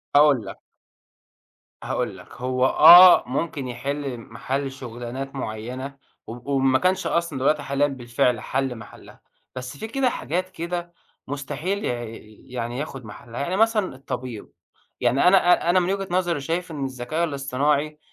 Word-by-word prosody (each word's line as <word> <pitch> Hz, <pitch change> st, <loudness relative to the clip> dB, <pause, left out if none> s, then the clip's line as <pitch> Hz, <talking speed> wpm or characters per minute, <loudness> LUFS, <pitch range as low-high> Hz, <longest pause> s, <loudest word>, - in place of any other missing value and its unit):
هاقول 145 Hz, -6 st, +5 dB
لك. -, -, -9 dB, 1.2 s
هاقول -, -, -3 dB
لك، -, -, -14 dB
هو 130 Hz, 0 st, +1 dB
آه 175 Hz, +6 st, +9 dB
ممكن 140 Hz, +1 st, -3 dB
يحِل 135 Hz, +2 st, -4 dB
محَل 135 Hz, +4 st, -4 dB
شغلانات 130 Hz, +1 st, -7 dB
مُعينة، 130 Hz, +4 st, -6 dB, 0.3 s
و 120 Hz, +5 st, -6 dB
وإن 135 Hz, 0 st, +1 dB
ما 130 Hz, 0 st, +4 dB
كانش 185 Hz, +1 st, +1 dB
أصلًا 170 Hz, -5 st, -1 dB
دلوقتي 145 Hz, +3 st, +1 dB
حاليًا 140 Hz, +1 st, +1 dB
بالفعل 120 Hz, -2 st, 0 dB
حَل 135 Hz, -1 st, -2 dB
محلّها، 115 Hz, -, -13 dB, 0.3 s
بس 130 Hz, +2 st, -7 dB
في 220 Hz, -, -6 dB
كده 260 Hz, +2 st, +1 dB
حاجات 180 Hz, -, -3 dB
كده 175 Hz, 0 st, -5 dB, 0.3 s
مستحيل 155 Hz, +9 st, -3 dB
ي -, -, 0 dB, 0.6 s
يعني 120 Hz, 0 st, -4 dB
ياخد 135 Hz, -4 st, -6 dB
محلَّها. 115 Hz, +3 st, -9 dB
يعني 175 Hz, +6 st, -2 dB
مثلًا 215 Hz, -, +2 dB
الطبيب، 125 Hz, -4 st, -7 dB, 0.5 s
يعني 125 Hz, +6 st, +3 dB
أنا 190 Hz, +2 st, +7 dB, 0.3 s
أ -, -, +3 dB
أنا 180 Hz, +1 st, +5 dB
من 180 Hz, +2 st, 0 dB
وجهة 195 Hz, -1 st, -3 dB
نظري 175 Hz, -4 st, 0 dB
شايف 170 Hz, +5 st, -3 dB
إن 145 Hz, -3 st, -3 dB
الذكاء 130 Hz, +6 st, -3 dB
الاصطناعي، 145 Hz, +1 st, -1 dB
140 Hz, 150 wpm, -23 LUFS, 125-170 Hz, 1.2 s, آه